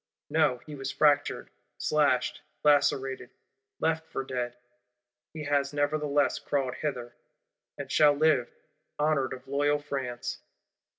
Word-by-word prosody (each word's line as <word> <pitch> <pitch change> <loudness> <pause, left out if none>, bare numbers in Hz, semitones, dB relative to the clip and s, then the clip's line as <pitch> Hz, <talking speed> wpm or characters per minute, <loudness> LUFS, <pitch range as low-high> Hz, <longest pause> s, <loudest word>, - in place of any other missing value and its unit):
No, 155 -5 +3
he 150 - -9
was 135 -1 -4
fractured, 145 -1 +2 0.3
slashed, 145 -4 +1 0.2
lacerated, 135 -3 +2 0.5
left 160 0 0
for 135 - -4
dead; 125 -2 -4 0.7
he 155 -1 -7
has 145 -1 0
nevertheless 145 -1 +1
crawled 135 -3 -1
hither; 125 -5 -4 0.6
and - - -6
shall 150 -1 +6
live, 145 -4 +2 0.5
honoured 150 -3 +1
of 130 0 -8
loyal 145 +2 +2
France. 135 -4 -4
145 Hz, 115 wpm, -28 LUFS, 130-150 Hz, 0.7 s, shall